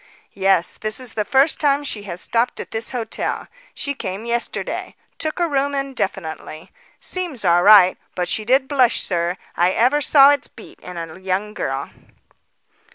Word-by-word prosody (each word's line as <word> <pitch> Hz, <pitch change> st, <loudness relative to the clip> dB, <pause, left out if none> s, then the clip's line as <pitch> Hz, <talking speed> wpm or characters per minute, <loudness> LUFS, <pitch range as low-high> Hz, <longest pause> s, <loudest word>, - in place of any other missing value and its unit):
"Yes; 190 Hz, -3 st, +1 dB
this 215 Hz, +2 st, 0 dB
is 250 Hz, -3 st, -7 dB
the 210 Hz, -, -1 dB
first 270 Hz, +7 st, +2 dB
time 285 Hz, -1 st, +2 dB
she 225 Hz, -7 st, -5 dB
has 175 Hz, -, -2 dB
stopped 235 Hz, +1 st, 0 dB
at -, -, -7 dB
this 225 Hz, 0 st, -1 dB
hotel. 230 Hz, -4 st, -3 dB, 0.3 s
She 280 Hz, -, -2 dB
came 195 Hz, -4 st, -6 dB
yesterday. 235 Hz, 0 st, -3 dB, 0.2 s
Took 310 Hz, +2 st, -3 dB
a 345 Hz, -, +2 dB
room 280 Hz, -1 st, 0 dB
indefinitely. 195 Hz, -, -4 dB, 0.3 s
Seems 340 Hz, -, -3 dB
all 175 Hz, 0 st, +4 dB
right; 195 Hz, -2 st, +7 dB, 0.2 s
but 180 Hz, -1 st, -1 dB
she 215 Hz, -, -1 dB
did 260 Hz, +4 st, +2 dB
blush, 260 Hz, -4 st, +2 dB
sir. 175 Hz, 0 st, -1 dB, 0.2 s
I 175 Hz, +1 st, +3 dB
ever 260 Hz, +6 st, +2 dB
saw 280 Hz, -1 st, +7 dB
its 285 Hz, -2 st, -1 dB
beat 225 Hz, -, -14 dB
in 180 Hz, -1 st, -9 dB
a 165 Hz, +1 st, -7 dB
young 190 Hz, +3 st, -2 dB
girl." 135 Hz, -5 st, -4 dB
225 Hz, 165 wpm, -20 LUFS, 185-275 Hz, 0.3 s, right